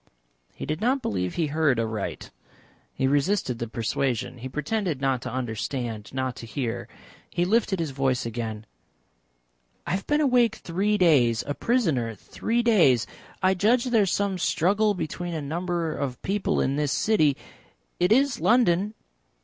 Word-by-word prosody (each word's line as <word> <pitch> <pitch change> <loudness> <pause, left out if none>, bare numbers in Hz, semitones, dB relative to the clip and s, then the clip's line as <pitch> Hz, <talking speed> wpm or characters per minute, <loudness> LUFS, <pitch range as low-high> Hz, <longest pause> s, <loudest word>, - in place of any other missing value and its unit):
He - - -6
did 155 +1 -3
not 255 +3 +1
believe 90 - -2
he 165 - +1
heard 150 -4 +1
aright. 110 -3 -3 0.6
He 130 - -2
resisted 140 - +1
the 120 - -3
persuasion. 120 +2 -2
He 130 +2 -6
pretended 155 - -2
not 135 -2 0
to 130 - -5
understand, 120 -2 -4
not 130 -1 -2
to 115 - -8
hear. 120 -2 -3 0.4
He 175 0 0
lifted 205 -1 +1
his 160 -4 -2
voice 135 -2 0
again. 110 -2 -4 1.2
"I - - -3
have 190 +2 -2
been 295 0 +2
awake 245 -6 +3
three 200 +5 0
days 125 - +4
a 145 - -2
prisoner 150 - 0
three 235 - -2
days. 165 - +4 0.4
I 185 0 +5
judge 225 +6 +3
there 240 -4 +3
is 195 - +1
some 200 -2 0
struggle 200 +7 +2
between 175 0 -4
a - - -2
number 170 +2 -2
of 130 -3 -3
people 195 +1 0
in 135 +2 0
this 150 -2 0
city 155 -11 +2 0.6
it 180 +2 +2
is 270 +3 +3
London?" 210 -3 +3
155 Hz, 155 wpm, -25 LUFS, 125-205 Hz, 1.2 s, I